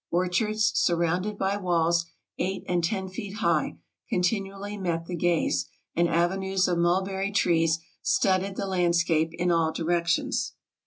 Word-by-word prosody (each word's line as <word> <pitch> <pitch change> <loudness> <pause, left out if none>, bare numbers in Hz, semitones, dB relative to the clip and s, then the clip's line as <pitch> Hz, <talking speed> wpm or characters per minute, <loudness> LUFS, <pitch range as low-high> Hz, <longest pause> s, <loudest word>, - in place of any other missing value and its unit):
Orchards, 210 +5 +1
sur 180 -9 +2
rounded 180 +5 -1
by 195 +1 0
walls 170 -3 +1 0.3
eight 190 +1 -2
and 175 -1 0
ten 190 +2 -1
feet 195 +2 -7
high, 170 -9 0 0.3
continually 195 +2 -1
met 170 -4 -2
the 175 - -4
gaze, 170 -1 +1 0.3
and 170 0 +2
avenues 190 +3 +1
of 175 -1 0
mulberry 190 +3 +1
trees 165 -4 +2 0.2
studded 190 0 +1
the 200 - -2
land 180 -3 +1
scape 165 -2 +2
in 175 0 +1
all 165 -1 +2
directions. 175 - 0
180 Hz, 145 wpm, -27 LUFS, 170-195 Hz, 0.3 s, sur